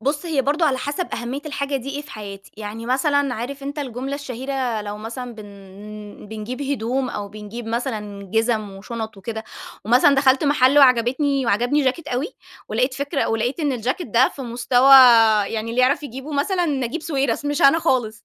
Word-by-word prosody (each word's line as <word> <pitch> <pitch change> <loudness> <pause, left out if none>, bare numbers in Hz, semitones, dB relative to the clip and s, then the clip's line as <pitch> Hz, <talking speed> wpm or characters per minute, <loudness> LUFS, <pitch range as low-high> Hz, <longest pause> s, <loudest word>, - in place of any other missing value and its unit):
بُص 290 +7 -2
هي 305 -5 +1
برضه 295 +5 +1
على 265 -3 +1
حسب 290 +7 -3
أهمية 240 +4 -4
الحاجة 280 -1 -2
دي 270 +1 -6
إيه 285 +1 -5
في 295 - -14
حياتي. 200 -2 -9
يعني 215 +2 -7
مثلًا 275 +1 +1
عارف 265 +5 -6
أنتَ 285 +2 -5
الجملة 270 0 -4
الشهيرة 260 -4 -3
لو 205 0 -6
مثلًا 240 +3 -7
بن 205 0 -11
بنجيب 220 +5 -5
هدوم 260 -1 -1
أو 205 -1 -5
بنجيب 215 +3 -8
مثلًا 210 -5 -4
جزم 225 -1 0
وشنط 220 +3 -7
وكده، 220 +3 -6 0.4
ومثلًا 250 +6 +5
دخلت 270 +1 +3
محل 280 -1 +4
وعجبتني 265 +1 +3
وعجبني 245 +7 +2
جاكيت 285 +4 -1
أوي، 255 +7 -1 0.4
ولاقيت 250 +4 0
فكرة 280 +1 -1
ولاقيت 235 +7 -1
إن 290 -3 0
الجاكيت 255 - -2
ده 240 +5 +4
في 275 - -9
مستوى 245 +2 +2 0.6
يعني 225 +1 -4
اللي 240 +2 +1
يعرف 270 +3 +3
يجيبه 270 +2 -7
مثلًا 345 +5 0
نجيب 280 +1 -2
ساويرس 275 -5 -1
مش 290 +3 -1
أنا 275 +4 +6
خالص، 240 -7 -1
255 Hz, 175 wpm, -21 LUFS, 225-280 Hz, 0.6 s, أنا